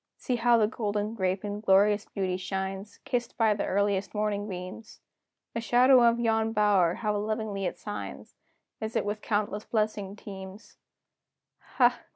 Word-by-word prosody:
See 250 - -2
how 235 0 +4
the 220 - +4
golden 210 0 -2
grape 190 -2 -1
in 205 0 -4
glorious 205 +1 +4
beauty 190 -2 -2
shines, 190 +2 -4
Kissed 240 -2 -2
by 225 -3 +4
the 205 - -2
earliest 200 0 0
morning 210 0 -1
beams! 185 +5 -8 0.5
The 230 - -2
shadow 250 +2 +5
of 235 0 +4
yon 225 -1 +1
bower, 200 -5 +3
how 210 -2 -1
lovingly 215 -2 -2
it - - -3
signs, 205 -1 -7 0.5
As 220 0 -4
it - - +1
with 210 +1 -3
countless 210 -1 -1
blessings 210 -3 -1
teams! 190 +1 -10 1.0
Ha! 245 -2 +4
210 Hz, 155 wpm, -28 LUFS, 195-225 Hz, 1.0 s, shadow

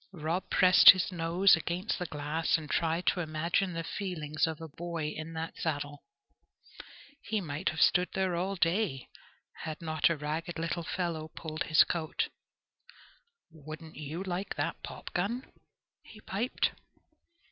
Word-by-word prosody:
Rob 170 +2 -2
pressed 185 0 +8
his 185 0 +7
nose 175 +2 +4
against 175 +6 -2
the 180 - -3
glass, 150 +3 0
and 155 -2 -8
tried 165 +3 0
to - - +2
imagine 170 +3 0
the 165 0 -3
feelings 160 -5 -2
of 160 -2 -4
a 165 - -7
boy 165 0 -4
in 155 +1 -6
that 160 0 -5
saddle. 145 -2 -3 1.2
He 220 - -1
might 155 -1 -2
have 155 - -3
stood 180 -1 +4
there 190 -2 +1
all 190 +3 -1
day, 170 -6 0 0.5
had 155 -1 -5
not 155 -2 +1
a 170 - 0
ragged 155 +4 -3
little 165 +1 -2
fellow 165 -2 -3
pulled 155 0 -5
his 155 +1 +6
coat. 160 -3 -2 1.2
"Wouldn't 155 +1 -10
you 155 +5 -5
like 185 +1 -3
that - - -2
popgun?" 215 +8 -3 0.6
he 215 - -14
piped. 215 +5 -1
165 Hz, 145 wpm, -31 LUFS, 155-180 Hz, 1.2 s, pressed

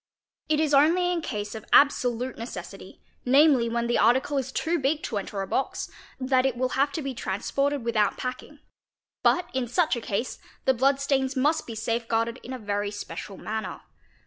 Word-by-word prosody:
It 305 -1 +2
is 310 -2 +1
only 340 +6 +4
in 345 -2 -1
case 210 -7 -4
of 220 -2 -7
absolute 250 -3 +3
necessity, 230 +2 -9 0.2
namely, 265 -2 +5
when 235 0 -1
the 240 - +1
article 260 +5 +3
is 265 0 -4
too 330 +4 0
big 290 +3 0
to 210 - -2
enter 195 0 -4
a - - -6
box, 270 - -2 0.3
that 260 0 +2
it 260 -2 0
will 255 +1 0
have 275 +3 +1
to 315 - -3
be 270 -1 -3
transported 270 +6 -1
without 215 -3 +1
packing; 255 +4 -6 0.6
but 360 - +3
in 260 -2 -1
such 310 +5 +2
a 235 - -4
case 230 +2 -3
— - - -30
the 265 - +5
blood 270 +3 +2
stains 270 -1 0
must 295 +5 +1
be 230 - -6
safe 230 +1 -2
guarded 230 +2 0
in 255 - -9
a 260 - -4
very 205 -2 -2
special 205 -1 -7
manner. 220 0 -5
255 Hz, 195 wpm, -26 LUFS, 230-280 Hz, 0.6 s, namely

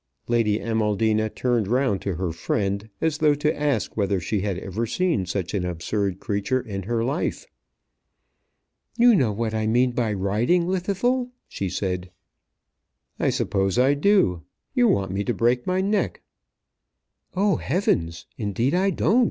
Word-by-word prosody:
Lady 115 -3 +2
Amaldina 110 -1 +1
turned 120 -3 0
round 125 -4 +1
to 100 -3 -2
her 90 0 -2
friend, 100 +5 -2
as 160 -2 0
though 150 -2 +4
to 150 +2 0
ask 145 -7 -1
whether 100 -2 +1
she 100 +4 -2
had 100 -2 -2
ever 100 +5 -3
seen 160 - 0
such 90 0 -3
an 100 -3 0
absurd 90 +3 -2
creature 100 +5 -1
in 100 -5 -5
her 115 +4 -1
life. 140 - -2 1.5
"You 240 0 +6
know 130 - +3
what 110 +1 -2
I 110 0 0
mean 125 +3 +3
by 120 -3 -1
riding, 105 - +1
Llwddythlw," 200 +8 0 0.2
she 95 - -4
said. 90 -1 -3 1.1
"I - - +2
suppose 95 -1 0
I 130 +3 +4
do. 145 - +3 0.3
You 250 -3 +4
want 95 - +1
me 100 +2 -1
to 120 - -1
break 120 +1 +1
my 185 +1 +1
neck." 205 +2 -1 1.1
"Oh, 195 -3 +2
heavens! 85 - -1
Indeed 115 +5 0
I 190 +2 +3
don't." 215 +4 +2
115 Hz, 150 wpm, -24 LUFS, 100-150 Hz, 1.5 s, You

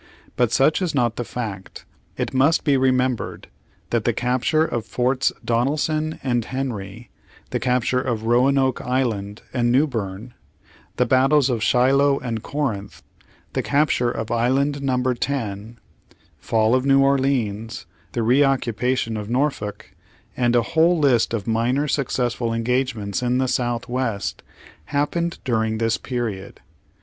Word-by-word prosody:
But 120 -2 +2
such 135 +8 +3
is 175 -5 -1
not 120 -4 +1
the 120 - -3
fact. 105 -6 -7 0.3
It - - -3
must 140 +5 +3
be 145 -3 +3
remembered 130 -3 0 0.4
that 115 -2 +1
the 120 - +1
capture 125 +7 +1
of 120 -8 -3
Forts 125 +5 0
Donelson 155 +6 0
and 120 -3 0
Henry; 115 -4 -5 0.4
the - - -1
capture 125 0 +1
of 115 -4 -2
Roanoke 130 +3 +2
Island 110 -6 -2
and 120 -2 +1
Newberne; 120 -5 -1 0.6
the 125 - +2
battles 135 +2 +3
of 115 -3 -1
Shiloh 135 +4 +3
and 115 -3 -4
Corinth; 110 -8 -4 0.5
the - - 0
capture 140 -4 +1
of 110 -2 -4
Island 135 +5 +1
Number 130 -2 +1
10; 115 -4 -4 0.6
fall 110 0 +1
of 130 0 +2
New 135 0 +4
Orleans, 125 -6 0 0.3
the 115 - -1
re 125 +5 +4
oc 135 -2 +2
cupation 115 -1 -1
of 105 0 -7
Norfolk, 125 -5 -2 0.4
and 120 -1 +1
a 120 - +4
whole 165 +6 +3
list 135 -7 +3
of 110 -4 -2
minor 120 +6 +1
suc 140 -2 0
cessful 120 -2 -1
engagements 115 -4 -1
in 125 0 +1
the 130 0 +1
South 120 -2 -1
west, 120 -5 -2 0.4
happened 170 - -1
during 110 -3 0
this 115 0 0
period. 115 -7 -4
125 Hz, 140 wpm, -22 LUFS, 115-135 Hz, 0.6 s, New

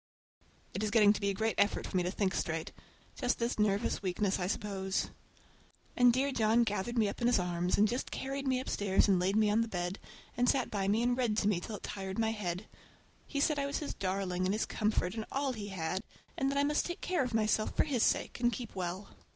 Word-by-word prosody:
It 195 - -3
is 215 - 0
getting 210 -2 +6
to 215 - -5
be 200 - +1
a - - 0
great 220 +2 0
effort 205 +1 +2
for - - -6
me 185 - +3
to 175 - -1
think 190 0 0
straight. 165 -1 -2 0.4
Just 250 -2 0
this 235 -1 -2
nervous 210 +1 +1
weakness, 195 +1 0
I 180 - -1
suppose. 190 -1 -2 0.8
And 245 -1 +6
dear 270 +3 +1
John 225 -1 +3
gathered 225 +2 -2
me 220 -2 +4
up 200 - -5
in 240 - +3
his 245 - +4
arms, 180 0 0
and 210 - +5
just 245 +4 -2
carried 275 +1 -4
me 260 -1 +2
upstairs 205 -7 +1
and 190 -3 +4
laid 190 +3 +1
me 215 0 +4
on 220 +2 +3
the 230 - 0
bed, 180 -1 -3 0.4
and 245 0 +2
sat 260 -3 +1
by 195 -2 -1
me 215 +4 +2
and 245 0 +2
read 240 -4 0
to 205 - +2
me 200 -4 +2
till 210 +4 -6
it - - -10
tired 190 -2 -5
my 225 -1 +1
head. 190 -2 -4 0.6
He 285 - -3
said 295 0 +2
I 280 - 0
was 280 - -2
his 295 - -4
darling 185 -1 -1
and 195 - +1
his 220 - 0
comfort 210 -4 0
and 220 -1 -3
all 275 -1 0
he 210 -3 -6
had, 185 -1 -2 0.3
and 270 - 0
that 280 - -1
I 280 - +3
must 295 +1 +1
take 345 - -5
care 360 -6 +1
of 245 -3 -3
myself 215 0 +1
for - - +5
his 265 -6 -1
sake, - - +1
and 240 0 +3
keep 240 -4 -6
well. 185 +1 -4
215 Hz, 245 wpm, -32 LUFS, 190-245 Hz, 0.8 s, getting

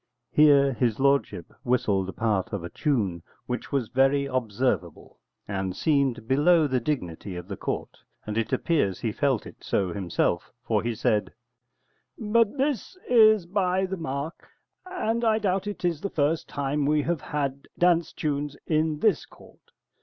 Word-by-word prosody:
[Here 140 -2 +5
his 120 -2 0
lordship 140 -10 +1
whistled 100 -6 +1
a - - -3
part 105 -4 -1
of 100 -4 -3
a 85 - -7
tune, 105 - -1 0.2
which 125 0 -4
was 135 -6 -1
very 135 +2 +3
observable, 125 - -2 0.3
and 95 -2 -3
seemed 140 -7 +1
below 155 +5 +4
the 130 -3 +1
dignity 100 - -4
of 90 0 -7
the 100 - -5
court. - - -5 0.3
And 105 - -4
it 115 0 -1
appears 145 - +1
he 115 - -1
felt 135 -1 0
it - - -13
so 95 -3 0
himself, 85 -2 -1
for 110 -3 +1
he 115 +1 -2
said:] 110 -2 0 0.9
But 225 +2 +2
this 280 - -1
is 215 -5 +6
by 185 0 +1
the 190 +1 -3
mark, 155 -1 -5 0.4
and 235 -11 -1
I 220 -1 +3
doubt 195 -2 0
it 205 -3 -4
is 165 -4 0
the 200 - -2
first 150 0 0
time 140 0 -1
we 150 0 +2
have 170 -2 -1
had 140 -2 -3
dance 170 -2 +3
tunes 145 -2 -3
in 155 -1 0
this 215 -6 +2
court. - - -19
140 Hz, 160 wpm, -26 LUFS, 110-170 Hz, 0.9 s, is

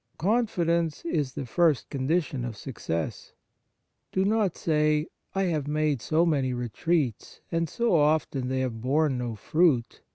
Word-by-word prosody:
Confidence 170 -7 +1
is 150 -6 -1
the 140 - -4
first 155 +2 +2
condition 140 -1 0
of 120 -3 -5
success. 85 - -4 0.8
Do 190 0 +1
not 210 -3 +1
say: 150 -1 +2 0.3
"I 195 - +2
have 155 -6 -1
made 150 -3 0
so 160 +8 +2
many 140 -6 +1
retreats, 125 - -1
and 165 -1 0
so 235 -3 0
often 150 -4 +2
they 130 0 -1
have 120 -4 -3
borne 135 +1 +1
no 120 -2 -3
fruit 145 - +1
150 Hz, 140 wpm, -27 LUFS, 130-170 Hz, 0.8 s, first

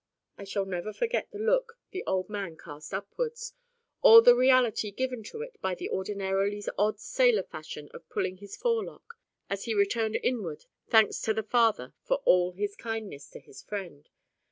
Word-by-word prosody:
I 200 - -10
shall 195 0 -2
never 190 +2 -4
forget 475 - -1
the 415 - -9
look 470 +2 0
the 380 - -5
old 185 -1 0
man 200 -6 -5
cast 150 -1 -11
upwards, 470 - -4 0.5
or 455 -2 +10
the - - +9
reality 255 -5 +3
given 250 +3 -3
to 450 - -6
it - - -12
by 190 -1 -1
the - - -6
ordinarily 195 +1 -1 0.2
odd 210 +1 +1
sailor 245 -4 +2
fashion 155 -2 -9
of 165 - -13
pulling 185 0 -2
his 200 +1 -10
forelock, 465 0 -2 0.3
as 200 0 -4
he 225 - -1
returned 215 +2 +1
inward 200 -12 -2 0.2
thanks 220 -2 +4
to 220 - 0
the 220 - -1
Father 225 0 +2
of - - -15
all 180 0 +4
for 180 - -23
His 205 0 -2
kindness 220 -11 -6
to - - -11
his 135 - -14
friend. 175 -8 -7
210 Hz, 180 wpm, -28 LUFS, 190-255 Hz, 0.5 s, or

